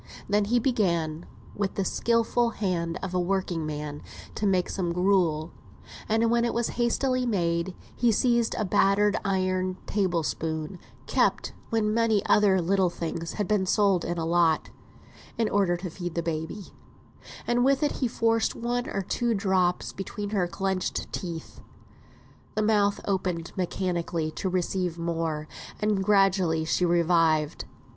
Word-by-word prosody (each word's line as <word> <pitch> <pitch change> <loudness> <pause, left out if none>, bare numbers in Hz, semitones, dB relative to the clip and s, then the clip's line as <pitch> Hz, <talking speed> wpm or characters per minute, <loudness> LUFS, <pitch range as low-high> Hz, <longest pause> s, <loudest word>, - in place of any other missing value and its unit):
Then 205 +1 +2
he 235 +4 +2
began, 175 - 0 0.3
with 200 -1 -2
the 195 - 0
useful 230 +2 +1
skill 170 -4 -1
of 185 -1 -4
a 180 - +1
working 175 -3 -1
man, 150 -1 -5 0.3
to 210 - -1
make 185 -2 +2
some 175 -3 -2
gruel; 175 -4 +1 0.6
and 225 +1 +2
when 235 0 +3
it 235 - -1
was 235 0 0
hastily 250 +1 0
made 170 -3 0 0.2
he 240 -1 +3
seized 235 +1 +2
a 215 - -1
battered 205 +2 +3
iron 185 -1 0
table 185 -5 0
spoon 160 +3 -3 0.3
(kept - - +1 0.2
when 215 -2 +1
many 225 -3 +2
other 200 -3 +4
little 185 +1 +2
things 170 -1 -4
had 205 -3 -2
been 200 -3 +1
sold 195 -3 +3
in 175 - -3
a 165 - -1
lot), 165 -1 +2 0.7
in 230 - +2
order 195 -4 +2
to 180 -1 -6
feed 175 -1 -6
baby, 160 +4 -4 0.7
and 240 0 +2
with 275 +3 +3
it 295 - +2
he 255 - +1
forced 230 -1 +1
one 240 +1 -2
or 195 - -2
two 235 +4 0
drops 190 -3 +1
between 205 +1 -5
her 190 -4 +1
clenched 190 +1 -2
teeth. 170 -3 -6 0.9
The 215 - +1
mouth 205 -2 +2
opened 180 -4 -1
mechanically 175 -3 -2
to 190 - -3
receive 180 -1 -1
more, 165 -2 -2 0.3
and 210 -2 +1
gradually 190 -5 +3
she 170 +3 +1
revived. 165 -3 +2
190 Hz, 150 wpm, -27 LUFS, 170-210 Hz, 0.9 s, other